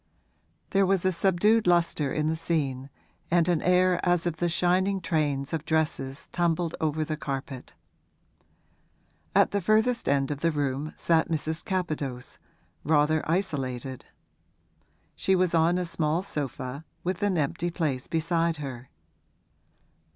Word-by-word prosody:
There 195 Hz, -1 st, +3 dB
was 190 Hz, -1 st, +1 dB
a 185 Hz, -, +4 dB
subdued 195 Hz, +4 st, +3 dB
lustre 170 Hz, -5 st, +2 dB
in 155 Hz, 0 st, 0 dB
the 160 Hz, -, +1 dB
scene 140 Hz, -5 st, -2 dB, 0.4 s
and 170 Hz, 0 st, +3 dB
an 175 Hz, -3 st, +2 dB
air 180 Hz, 0 st, +3 dB
as 175 Hz, -1 st, +2 dB
of 170 Hz, -2 st, -1 dB
the 175 Hz, +2 st, 0 dB
shining 185 Hz, +3 st, +1 dB
trains 145 Hz, -5 st, -1 dB
of 160 Hz, -2 st, -2 dB
dresses 155 Hz, -4 st, -1 dB
tumbled 170 Hz, -1 st, 0 dB
over 155 Hz, 0 st, 0 dB
the 155 Hz, -, -2 dB
carpet. 135 Hz, -3 st, -6 dB, 1.6 s
At -, -, +5 dB
the 200 Hz, -, 0 dB
furthest 220 Hz, +5 st, +2 dB
end 140 Hz, 0 st, +1 dB
of 145 Hz, -, -3 dB
the 165 Hz, -, +2 dB
room 145 Hz, 0 st, -2 dB
sat 165 Hz, -1 st, +2 dB
Mrs. 160 Hz, 0 st, -2 dB
Capadose, 155 Hz, -, -3 dB, 0.4 s
rather 155 Hz, 0 st, +3 dB
isolated; 135 Hz, -8 st, -2 dB, 1.1 s
she 190 Hz, -, +2 dB
was 180 Hz, -2 st, +1 dB
on 165 Hz, +2 st, +3 dB
a 180 Hz, -, -1 dB
small 165 Hz, 0 st, -1 dB
sofa, 140 Hz, -, -5 dB, 0.2 s
with 180 Hz, 0 st, -2 dB
an 200 Hz, -3 st, +1 dB
empty 155 Hz, +3 st, -1 dB
place 150 Hz, -7 st, -2 dB
beside 165 Hz, 0 st, 0 dB
her. 130 Hz, -4 st, -7 dB
160 Hz, 135 wpm, -27 LUFS, 145-180 Hz, 1.6 s, At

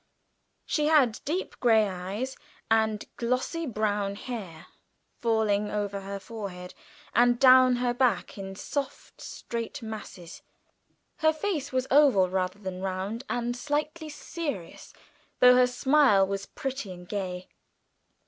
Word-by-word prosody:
She 300 Hz, -1 st, 0 dB
had 280 Hz, -8 st, +4 dB
deep 345 Hz, +6 st, -3 dB
grey 220 Hz, -3 st, +4 dB
eyes 195 Hz, +8 st, -4 dB, 0.4 s
and 220 Hz, -1 st, +2 dB
glossy 255 Hz, +7 st, -1 dB
brown 205 Hz, -3 st, -1 dB
hair 200 Hz, -9 st, -7 dB, 0.5 s
falling 215 Hz, -3 st, +1 dB
over 205 Hz, -1 st, -2 dB
her 200 Hz, +1 st, -5 dB
forehead 195 Hz, -5 st, -8 dB, 0.4 s
and 240 Hz, 0 st, +4 dB
down 255 Hz, -1 st, +7 dB
her 245 Hz, 0 st, 0 dB
back 245 Hz, -5 st, +1 dB
in 195 Hz, -1 st, -7 dB
soft 280 Hz, +7 st, -5 dB
straight 230 Hz, 0 st, -6 dB
masses, 210 Hz, -6 st, -8 dB, 0.8 s
her 315 Hz, 0 st, +4 dB
face 310 Hz, -4 st, -3 dB
was 255 Hz, 0 st, 0 dB
oval 265 Hz, -10 st, +5 dB
rather 185 Hz, 0 st, -1 dB
than 190 Hz, -2 st, -6 dB
round, 195 Hz, +6 st, -3 dB
and 240 Hz, 0 st, -1 dB
slightly 300 Hz, +4 st, -3 dB
serious, 295 Hz, -, -6 dB, 0.5 s
though 250 Hz, 0 st, +8 dB
her 250 Hz, 0 st, +5 dB
smile 250 Hz, -5 st, +4 dB
was 195 Hz, 0 st, -4 dB
pretty 265 Hz, -7 st, -5 dB
and 180 Hz, -1 st, -10 dB
gay. 185 Hz, -3 st, -4 dB
225 Hz, 125 wpm, -27 LUFS, 195-260 Hz, 0.8 s, though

